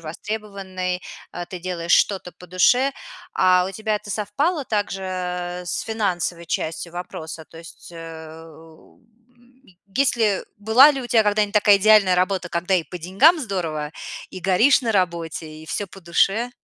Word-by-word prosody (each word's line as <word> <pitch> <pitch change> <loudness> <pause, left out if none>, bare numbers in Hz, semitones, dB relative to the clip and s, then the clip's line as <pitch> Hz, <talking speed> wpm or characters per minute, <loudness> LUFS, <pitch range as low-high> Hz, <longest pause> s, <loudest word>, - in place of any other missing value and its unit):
востребованной. 185 +1 -5 0.3
Э, 175 0 -6
ты 180 +1 -7
делаешь 175 -1 -2
что-то 190 -3 +2
по 180 - -15
душе. 245 +10 +3 0.4
А 180 -1 +4
у - - -8
тебя 215 +2 -2
это 210 0 -9
совпало 270 - -1
также 185 -3 -3
с 175 - -3
финансовой 180 -6 -2
частью 165 +1 -3
вопроса? 160 -2 -7
То - - -15
есть, 170 +1 -13
э, 165 -1 -10
у, 160 0 -18 0.4
м, 245 +2 -27 0.3
есть 270 -1 +2
ли 210 -4 +1
была 220 +8 +6
ли 275 -3 -3
у - - -6
тя 230 -2 +4
когда-нибудь 210 0 +1
такая 205 -1 +6
идеальная 200 -2 +5
работа, 185 0 0
когда 175 +2 0
и 180 - +2
по 180 - -8
деньгам 195 - +4
здорово, 165 - -3 0.4
и 185 - -8
горишь 195 +10 +4
на 235 -3 -1
работе, 170 -5 -1
и 155 +1 -12
всё 205 - -3
по 195 +1 -14
душе? 195 +7 +1
185 Hz, 160 wpm, -22 LUFS, 170-215 Hz, 0.4 s, была